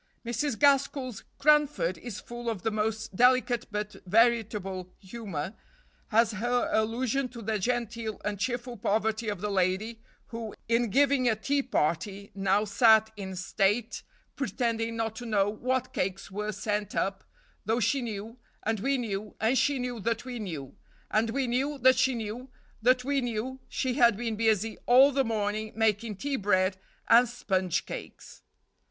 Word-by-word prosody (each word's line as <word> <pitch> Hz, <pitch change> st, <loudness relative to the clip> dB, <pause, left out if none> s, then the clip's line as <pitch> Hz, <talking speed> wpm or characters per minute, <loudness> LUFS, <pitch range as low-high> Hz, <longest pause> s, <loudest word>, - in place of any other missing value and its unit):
Mrs. 235 Hz, +2 st, -1 dB
Gaskell's 275 Hz, -4 st, +2 dB
"Cranford" 295 Hz, -, +3 dB
is 235 Hz, -4 st, -7 dB
full 240 Hz, 0 st, -6 dB
of 215 Hz, -6 st, -4 dB
the 225 Hz, -, 0 dB
most 215 Hz, -1 st, -2 dB
delicate 250 Hz, 0 st, +3 dB
but 210 Hz, 0 st, -4 dB
veritable 210 Hz, -4 st, +1 dB
humor, 190 Hz, -5 st, -6 dB, 0.6 s
as 225 Hz, +1 st, +4 dB
her 240 Hz, +3 st, 0 dB
allusion 245 Hz, +4 st, 0 dB
to 240 Hz, 0 st, -10 dB
the 215 Hz, 0 st, -1 dB
genteel 230 Hz, 0 st, -2 dB
and 210 Hz, -1 st, -2 dB
cheerful 245 Hz, +1 st, -3 dB
poverty 220 Hz, +1 st, 0 dB
of 205 Hz, -3 st, -4 dB
the 210 Hz, 0 st, -2 dB
lady 195 Hz, +4 st, 0 dB, 0.3 s
who, 230 Hz, -2 st, -6 dB
in 235 Hz, 0 st, +2 dB
giving 275 Hz, +1 st, +3 dB
a 220 Hz, -, +2 dB
tea 280 Hz, +6 st, 0 dB
party, 200 Hz, -, -1 dB
"now 195 Hz, +1 st, +1 dB
sat 220 Hz, +1 st, +5 dB
in 190 Hz, -2 st, -6 dB
state, 205 Hz, +5 st, 0 dB, 0.3 s
pretending 230 Hz, -2 st, -1 dB
not 225 Hz, -1 st, -2 dB
to 245 Hz, -, -6 dB
know 205 Hz, -3 st, +2 dB
what 255 Hz, +4 st, -2 dB
cakes 195 Hz, +1 st, -3 dB
were 210 Hz, +2 st, -3 dB
sent 205 Hz, 0 st, -3 dB
up, 195 Hz, 0 st, -1 dB, 0.4 s
though 225 Hz, +3 st, +1 dB
she 245 Hz, +5 st, +1 dB
knew, 225 Hz, +1 st, -6 dB, 0.2 s
and 220 Hz, 0 st, 0 dB
we 275 Hz, +6 st, +1 dB
knew, 210 Hz, -3 st, -4 dB
and 225 Hz, +4 st, +2 dB
she 285 Hz, +2 st, +2 dB
knew 250 Hz, -2 st, -3 dB
that 230 Hz, +3 st, -2 dB
we 250 Hz, -2 st, -5 dB
knew; 160 Hz, -10 st, -6 dB, 0.4 s
and 220 Hz, +2 st, +2 dB
we 265 Hz, +3 st, 0 dB
knew 265 Hz, +4 st, -1 dB
that 260 Hz, 0 st, +5 dB
she 260 Hz, 0 st, +3 dB
knew 230 Hz, +3 st, -5 dB, 0.3 s
that 250 Hz, +2 st, +4 dB
we 280 Hz, +1 st, +1 dB
knew 245 Hz, +2 st, -3 dB
she 260 Hz, -1 st, -1 dB
had 235 Hz, -5 st, +4 dB
been 230 Hz, -1 st, -2 dB
busy 220 Hz, 0 st, +1 dB
all 260 Hz, +4 st, +7 dB
the 270 Hz, 0 st, +2 dB
morning 215 Hz, -1 st, -2 dB
making 220 Hz, 0 st, +1 dB
tea 275 Hz, +7 st, -2 dB
bread 185 Hz, -2 st, +2 dB, 0.3 s
and 235 Hz, +1 st, +6 dB
sponge 190 Hz, -7 st, -1 dB
cakes." -, -, -9 dB
225 Hz, 160 wpm, -28 LUFS, 205-245 Hz, 0.6 s, all